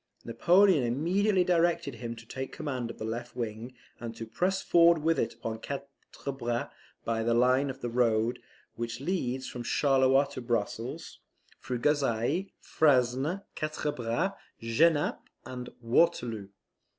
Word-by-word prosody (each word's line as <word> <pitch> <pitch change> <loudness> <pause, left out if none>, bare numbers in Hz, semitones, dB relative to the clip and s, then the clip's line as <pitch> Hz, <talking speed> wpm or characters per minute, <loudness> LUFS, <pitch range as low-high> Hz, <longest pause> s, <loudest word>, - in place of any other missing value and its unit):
Napoleon 175 - +4
immediately 180 - +2
directed 170 -5 +1
him 115 0 -6
to 115 0 -12
take 130 +3 -5
the - - -12
command 130 -6 -3
of - - -8
the 110 - -5
left 115 +2 -5
wing, 115 +1 -5 0.2
and 115 -1 -6
to 115 - -6
press 180 +12 0
forward 170 -3 +4
with 165 +1 +2
it - - -1
upon 110 -1 -5
Quatre 140 0 -7
Bras 120 -1 -2 0.3
by 115 -1 0
the 115 +1 +1
line 130 +3 +3
of 135 0 -7
the 120 - -2
road 115 0 +2 0.3
which 120 +1 -4
leads 135 -5 -2
from 120 - -6
Charleroi 135 +2 +3
to 135 - -6
Brussels, 120 +5 -3 0.4
through 125 - -3
Gosselies, 145 - +1
Frasne, 140 +5 +2
Quatre 155 -1 -2
Bras, 120 +10 -1 0.3
Genappe, 145 +7 +2 0.2
and 125 -1 -6
Waterloo. 115 -5 +1
130 Hz, 145 wpm, -29 LUFS, 115-155 Hz, 0.4 s, Napoleon